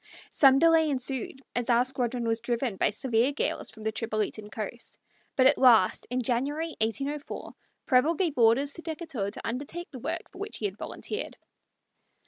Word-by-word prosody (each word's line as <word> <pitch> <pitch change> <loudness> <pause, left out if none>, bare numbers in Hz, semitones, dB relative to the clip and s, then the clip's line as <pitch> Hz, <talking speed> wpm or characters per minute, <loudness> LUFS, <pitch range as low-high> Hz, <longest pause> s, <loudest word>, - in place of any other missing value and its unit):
Some 270 -2 +6
delay 325 0 +5
ensued, 265 0 -3
as 245 +1 -1
our 240 +1 +4
squadron 250 -2 -2
was 225 0 0
driven 240 -2 -1
by - - +2
severe 235 +3 +1
gales 290 - -1
from 220 - -11
the 220 - 0
Tripolitan 215 -1 -3
coast; 225 +2 -6 0.4
but 260 - +4
at 275 +2 +5
last, 230 -8 +5
in 250 +1 -1
January, 280 +8 0
1804, 275 +7 -3 0.3
Preble 280 +5 +3
gave 325 -3 0
orders 245 +4 +4
to 335 - -8
Decatur 315 - -4
to 200 - -5
undertake 290 +8 -5
the 255 - -8
work 325 +7 -3
for 375 - -13
which 410 +2 -5
he 215 - -4
had 195 -1 -2
volunteered. 430 +3 -5
255 Hz, 170 wpm, -28 LUFS, 230-295 Hz, 0.4 s, Some